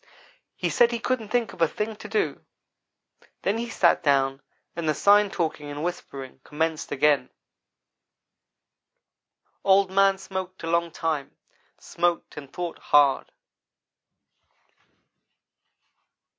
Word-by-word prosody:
He - - -2
said 240 - +5
he 235 - -1
couldn't 235 -2 -2
think 240 -1 0
of - - -12
a 165 - +5
thing 215 +7 -4
to 210 - -9
do 205 -9 -1 1.0
then 205 +4 0
he 235 0 -4
sat 180 -6 +3
down 135 -2 +2 0.3
and 165 -2 -2
the 155 - +1
sign 205 +3 +5
talking 160 -5 -3
and 145 +1 -5
whispering 135 -7 -6
commenced 160 +1 -2
again. 145 -2 +2 2.3
"Old 195 0 +4
man 195 0 +4
smoked 190 -1 -6
a - - -3
long 170 0 +1
time 155 -3 -3 0.4
smoked 175 -1 -1
and 140 -2 -9
thought 175 -2 -5
hard. 145 -2 +3
170 Hz, 115 wpm, -25 LUFS, 150-200 Hz, 2.3 s, said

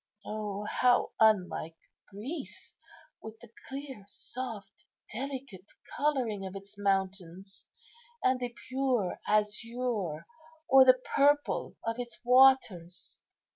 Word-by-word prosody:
O, 210 -1 -4
how 245 +3 +2
unlike 185 -7 +2 0.3
Greece, 260 - -7 0.5
with 220 0 -10
the 235 -1 -15 0.2
clear, 270 -5 -7
soft, 210 -4 -6 0.3
delicate 255 -6 -6 0.3
colouring 255 -9 0
of 190 0 -6
its 195 +1 -9
mountains, 195 -1 -2 0.6
and 255 0 +3
the 245 -1 -2 0.2
pure 255 -7 0
azure 215 -5 -1 0.4
or 265 0 +8
the 255 0 +6 0.2
purple 290 +1 +2
of 230 +1 -2
its 240 -1 -5
waters!" 250 -9 +3
220 Hz, 100 wpm, -30 LUFS, 195-255 Hz, 0.6 s, or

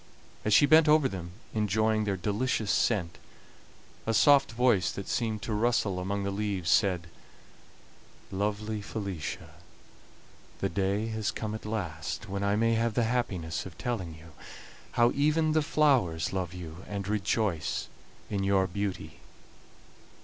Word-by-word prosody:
As 105 - 0
she 125 - +7
bent 155 +2 +6
over 150 -2 +5
them, 90 -7 -6 0.2
enjoying 110 +1 +1
their 100 -2 -1
delicious 105 +3 0
scent, 90 -8 +1 0.9
a 115 - +1
soft 140 +4 +5
voice, 115 -7 +2
that 100 - -7
seemed 110 -4 -1
to 110 - -2
rustle 105 -4 +1
among 100 +2 -2
the 100 - -1
leaves, 100 -3 -1
said: 90 -5 +3 1.3
"Lovely 105 +2 -2
Felicia, 100 -6 -5 1.1
the - - -1
day 100 +4 0
has 110 -2 -2
come 110 -1 -4
at 110 -1 -6
last 90 -4 -4
when 100 0 -3
I 100 0 +2
may 115 +2 +2
have 115 -1 0
the 120 - +3
happiness 95 -9 -2
of 90 - -13
telling 100 -10 -3
you 80 +1 -14 0.6
how 120 0 +4
even 155 +2 +2
the 155 0 +3
flowers 125 - +2
love 90 -3 -2
you 90 -1 -9
and 100 -2 -4
rejoice 105 -4 -1 0.4
in 100 -2 -2
your 95 -1 +3
beauty." 100 +1 -4
105 Hz, 140 wpm, -29 LUFS, 95-115 Hz, 1.3 s, she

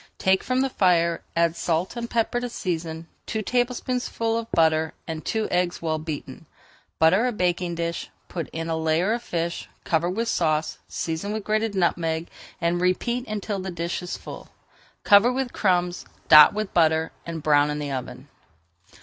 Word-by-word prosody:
Take 190 0 +2
from 255 0 +1
the 270 - +1
fire, 170 -4 +2
add 170 0 +2
salt 170 +5 -1
and 235 -1 -4
pepper 235 +1 0
to 245 0 -4
season, 165 -6 -4 0.2
two 220 -1 -2
tablespoonfuls 245 -1 -1
of - - -38
butter, 160 -1 +2
and 160 -1 -5
two 220 -1 -1
eggs 180 0 0
well 160 -1 -1
beaten. 155 -1 -7 0.5
Butter 190 +9 +4
a - - 0
baking 180 -4 -1
dish, 170 0 -3 0.2
put 170 -3 -5
in 165 0 -5
a 165 - -1
layer 160 +6 +1
of 235 - -2
fish, 170 -5 -3
cover 170 +1 +1
with 225 +6 -2
sauce, 155 -6 0
season 165 +6 -3
with 215 -1 -3
grated 215 0 0
nutmeg, 170 -2 0 0.3
and 170 +1 0
repeat 235 +7 0
until 210 -1 -3
the 190 0 -4
dish 170 0 -3
is 180 - -5
full. - - -10 0.5
Cover 205 +4 +6
with 255 -1 -2
crumbs, 180 -3 0 0.2
dot 150 -1 +10
with 215 -2 -3
butter, 160 -1 +3
and 165 -2 -6
brown 145 -1 +4
in 150 - -2
the 145 -1 -4
oven. 130 0 -6
175 Hz, 170 wpm, -24 LUFS, 160-215 Hz, 0.5 s, dot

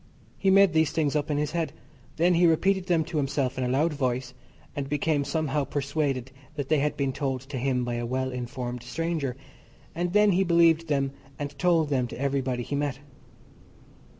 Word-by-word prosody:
He 195 - +2
made 195 -2 +6
these 160 -2 +3
things 155 -2 0
up 150 0 0
in 145 - 0
his 150 0 -1
head. 165 -2 -2 0.4
Then 175 +2 +3
he 175 0 +5
repeated 190 +3 +2
them 170 -3 +3
to 160 0 -5
himself 135 -2 0
in - - 0
a - - 0
loud 150 +6 +1
voice, 125 -3 -2 0.4
and 140 -1 -3
became 150 0 +1
somehow 150 -1 -1
persuaded 140 -2 -2 0.2
that 145 -3 -4
they 155 -2 +3
had 150 +1 0
been 135 -2 0
told 135 -3 -2
to 135 0 -6
him 125 -1 0
by 120 - -2
a 120 - -2
well 130 +1 -1
informed 125 -1 -5
stranger, 140 0 -3 0.6
and 175 +1 -2
then 210 +1 +5
he 190 +1 +3
believed 170 -2 +4
them 140 -2 0 0.3
and 145 0 -5
told 165 -3 +3
them 130 -3 +1
to 120 - -9
everybody 135 -3 -1
he 145 - -3
met. 140 -2 -1
145 Hz, 195 wpm, -27 LUFS, 130-165 Hz, 0.6 s, made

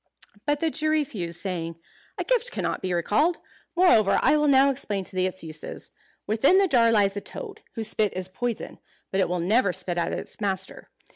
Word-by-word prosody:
But 290 0 +1
the 325 -1 +1
Jew 310 +1 -1
refused, 220 - -2
saying, 170 -3 -4 0.4
"A - - -1
gift - - +1
cannot - - -3
be 185 - -2
recalled. 215 - +2 0.4
Moreover, 240 - +5
I - - +5
will 300 0 +2
now 275 0 +5
explain 205 -7 -3
to 185 - -4
thee 185 0 +2
its 185 -1 -5
uses. 155 -1 -7 0.3
Within 230 - +4
the 390 0 +4
jar 235 -7 +4
lies 200 -3 +3
a 205 - -3
toad, - - -8
whose 220 -2 -1
spit 210 -3 0
is 185 0 -3
poison. 230 +5 -4 0.3
But 195 - 0
it 185 - +1
will 180 0 -1
never 200 +4 +2
spit 175 0 -2
at 170 - -1
its - - -6
master. 190 -2 -2
210 Hz, 200 wpm, -25 LUFS, 185-280 Hz, 0.4 s, Moreover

